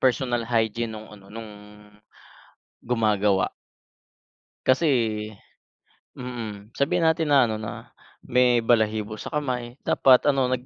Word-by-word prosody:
personal 125 -2 +1
hygiene 115 0 0
nung 110 0 -10
ano, 100 -2 -15
nung, 110 +1 -9 1.3
gumagawa. 105 -4 +1 1.2
Kasi 130 +6 +2 1.3
mm, 115 -4 -7
sabihin 165 +4 +1
natin 160 -1 +2
na 140 -1 +6
ano 110 -2 -2
na, 105 - -8 0.3
may 125 -1 +3
balahibo 110 -2 +1
sa - - -6
kamay, 125 -4 -4
dapat 130 -2 +4
ano, 135 -3 +2
nag, 130 0 -2
120 Hz, 115 wpm, -24 LUFS, 110-130 Hz, 1.3 s, na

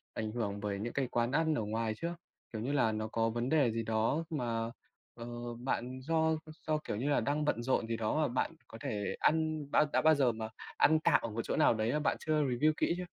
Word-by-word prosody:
ảnh 110 -1 -2
hưởng 100 -4 -2
bởi 100 -1 -2
những 115 +3 -4
cái 135 -2 0
quán 120 +1 0
ăn 160 +2 +2
ở 115 - 0
ngoài 110 +1 -1
chưa? 170 +1 -3 0.4
Kiểu 110 - -3
như 130 +5 -2
là, 130 -6 +3
nó 110 0 -2
có 115 +1 0
vấn 120 +3 -2
đề 140 -7 +3
gì 115 0 -2
đó 115 +8 +1
mà, 115 -6 -2 0.4
ờ, 115 - -8 0.3
bạn 130 0 -2
do 160 +2 +2 0.3
do, 155 -1 +2
kiểu 150 -8 -4
như 135 +5 -1
là, 145 - +3
đang 150 +1 0
bận 120 -5 0
rộn 120 -2 +1
gì 115 -1 -1
đó 110 -1 -1
mà 150 - +3
bạn 125 - -1 0.2
có 115 - -10
thể 105 -1 -2
ăn 155 -1 +1
bã 150 - +5
đã - - +4
bao 155 0 +6
giờ 130 -4 +3
mà 110 0 -5 0.3
ăn 155 +1 +5
tạm - - +3
ở 115 - -3
một 110 +2 -3
chỗ - - -2
nào - - +5
đấy 110 +1 0
mà 150 - +1
bạn - - +1
chưa 155 -1 +1
review 140 +4 +2
kĩ - - +2
chưa? 180 - -4
120 Hz, 250 wpm, -33 LUFS, 115-150 Hz, 0.4 s, bao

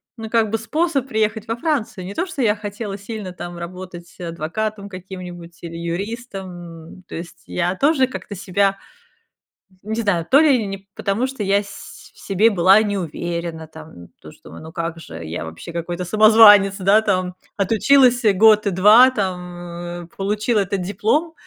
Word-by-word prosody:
ну, 225 -2 -7
как 225 -1 +2
бы, 225 - 0
способ 280 +4 -1
приехать 220 -2 -1
во 230 +1 -2
Францию. 235 - -2
Не 195 - -6
то, 345 - -1
что 360 -7 -5
я 210 -4 +3
хотела 205 -1 -6
сильно 200 -2 -7
там 175 0 -8
работать 175 0 -9
адвокатом 185 +5 -4
каким-нибудь 180 -2 -9
или 165 -1 -7
юристом, 195 +4 -5 0.4
м. 185 - -14
То - - -8
есть 170 +1 -9
я 180 +1 -1
тоже 275 - +3
как-то 230 -5 -8
себя, 195 +1 0 1.1
не 220 +2 -3
знаю, 185 -6 0
то 275 - +6
ли 275 -8 +3
не 195 0 -7
потому, 210 +6 -1
что 265 -5 -5
я 200 0 +2
с 200 - -11 0.2
в - - -21
себе 205 +4 +3
была 190 +1 +5
не 205 -1 -2
уверена, 170 -2 -4
там 155 - -13
то, - - -12
что, 75 - -16
ну 160 - -10
как 165 0 -4
же, 80 - -9
я 80 +2 -5
вообще 80 - -9
какой-то 175 +1 -4
самозванец, 210 0 +7
да, 200 +3 +4
там, 185 -4 -1 0.2
отучилась 245 +5 +4
год 215 +1 +5
и - - +3
2, 210 +7 +7
там, 175 -4 -5
э, - - -13
получила 210 +3 0
этот 195 -1 -1
диплом, 220 - 0
195 Hz, 170 wpm, -20 LUFS, 175-220 Hz, 1.1 s, самозванец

